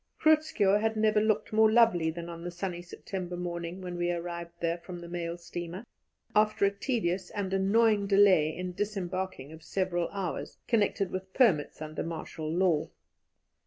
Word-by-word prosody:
Groot 315 0 +5
Schuurr 205 -8 +2
had 220 0 0
never 215 -1 +3
looked 215 0 0
more 220 0 +5
lovely 220 -8 +4
than 170 +1 -5
on 170 0 -8
the 175 - -3
sunny 175 0 -4
September 180 0 -6
morning 175 +1 -4
when 180 -1 -5
we 175 0 0
arrived 170 0 -4
there 170 +1 -1
from 175 +1 -8
the 175 0 -9
mail 170 0 -4
steamer, 175 +4 -7 0.5
after 215 -1 +3
a 200 - +3
tedious 200 -4 -1
and 195 -2 -3
annoying 205 +1 +3
delay 195 -6 +5
in 180 +3 -5
disembarking 185 -7 -3
of 160 0 -11
several 175 +1 -1
hours, 195 -4 -4
connected 205 -4 +1
with 185 0 -5
permits 170 - +3
under 155 0 -5
martial 160 -1 -5
law. 170 -3 +2
185 Hz, 165 wpm, -29 LUFS, 170-205 Hz, 0.5 s, Groot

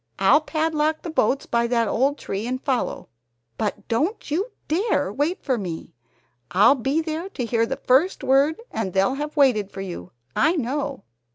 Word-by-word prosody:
I'll 195 +11 +5
padlock 310 0 0
the 335 - -5
boats 275 -2 +1
by 235 0 +1
that 235 -2 +1
old 275 +7 +1
tree 205 -1 -4
and 255 +1 -2
follow, 265 -2 -2 0.5
but 205 -1 -3
don't 310 - -1
you 380 +10 0 0.2
dare 375 +9 0
wait 300 +6 -1
for 255 -4 0
me! 175 -5 -6 0.6
I'll 200 +8 +6
be 270 +4 0
there 320 +3 -4
to 250 - -4
hear 230 0 +1
the - - -3
first 275 +9 +2
word 275 +4 +3
and 195 -5 -3
they'll 195 +6 +2
have 295 +3 -5
waited 240 -8 +3
for 195 - -7
you, 175 - -7 0.2
I 325 +3 +3
know. 280 - -2
270 Hz, 175 wpm, -23 LUFS, 225-310 Hz, 0.6 s, I'll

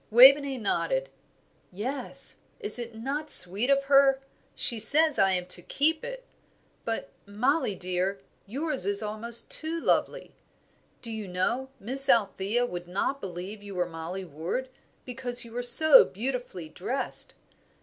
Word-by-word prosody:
Waveney 270 +4 +6
nodded. 165 - -2 0.6
"Yes. 250 +8 -7 0.2
Is 420 - +1
it 235 -1 -7
not 275 +7 -5
sweet 200 +8 +7
of 275 0 +2
her? 275 -1 +3 0.4
She 235 -3 +2
says 300 +7 +6
I 195 -1 +3
am 180 -1 -2
to 180 - -5
keep 310 - -1
it. - - -8 0.6
But, 225 -12 -5 0.2
Mollie, 225 +3 -1
dear, 185 +2 -3 0.3
yours 275 - -2
is 200 +1 +2
almost 230 +2 -2
too 325 +1 -3
lovely. - - -2 0.7
Do 230 - -1
you 220 -2 -7
know, 235 +9 -3
Miss 265 +6 +4
Althea 210 +2 +1
would 175 -6 -8
not 200 +10 -3
believe 190 +3 -8
you 200 -1 -11
were 180 -1 -1
Mollie 175 +3 -8
Ward, 170 - -6 0.4
because 245 -1 -1
you 230 - -13
were 245 +2 -4
so 265 +4 +5
beautifully 230 -6 -6
dressed. 245 - -4
230 Hz, 140 wpm, -26 LUFS, 190-270 Hz, 0.7 s, sweet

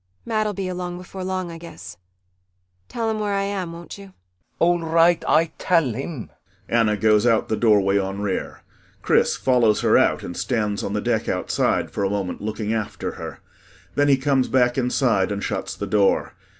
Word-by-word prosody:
Mat'll 215 -2 0
be 190 0 -3
along 180 -1 -4
before 185 +1 -8
long, 185 -1 -3
I 165 - -9
guess. 160 - -10 0.9
Tell 230 -1 -2
him 220 -1 -1
where 205 -1 -1
I 195 - 0
am, 195 -4 -3
will 170 0 -8
you? - - -12
CHRIS 195 0 -11 0.3
[Despondently.] - - -46
All 175 +1 +3
right, 165 +1 +3
Ay 160 0 +3
tal 165 -9 +2
him. 135 +1 -6 0.4
[ANNA 110 -2 +2
goes 105 +2 +3
out 115 -2 +2
the 110 - +1
doorway 100 -3 +3
on 95 0 -3
rear. 100 -2 -3 0.4
CHRIS - - +2
follows 120 -5 +3
her - - +4
out - - +2
and 90 - -6
stands 105 -5 -1
on - - -3
the - - -1
deck - - -1
outside - - 0
for - - -2
a 100 - +1
moment 100 -2 -3
looking 110 +1 -3
after 110 -2 -3
her. - - -8 0.5
Then 145 0 +2
he 140 -2 +5
comes 135 -1 +1
back 125 -2 +2
inside 120 -6 +1
and 100 0 -3
shuts - - -3
the 100 - -4
door. 100 0 +2
130 Hz, 190 wpm, -22 LUFS, 105-175 Hz, 0.9 s, he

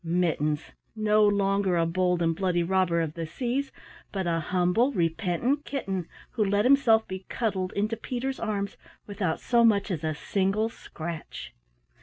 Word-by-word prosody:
Mittens, 165 -3 0 0.2
no 215 0 +3
longer 195 -2 +2
a 165 - +3
bold 180 +1 +1
and 165 0 +1
bloody 180 -1 +1
robber 175 -2 +2
of 160 -2 -2
the 165 -1 -5
seas 255 - -2 0.4
but 190 -2 -2
a 165 -1 +1
humble 180 - +2
repentant 185 - 0
kitten 195 - -3 0.2
who 220 - +1
let 205 +2 +2
himself 245 -5 +5
be 190 0 -7
cuddled 195 -6 -1
into 215 +3 0
Peter's 255 +3 -4
arms 205 -2 -2 0.3
without 200 -5 -2
so 235 -1 +3
much 210 -3 +3
as 165 -4 -3
a 155 -1 -1
single 195 +6 0
scratch. 160 - -8
190 Hz, 155 wpm, -27 LUFS, 170-220 Hz, 0.4 s, himself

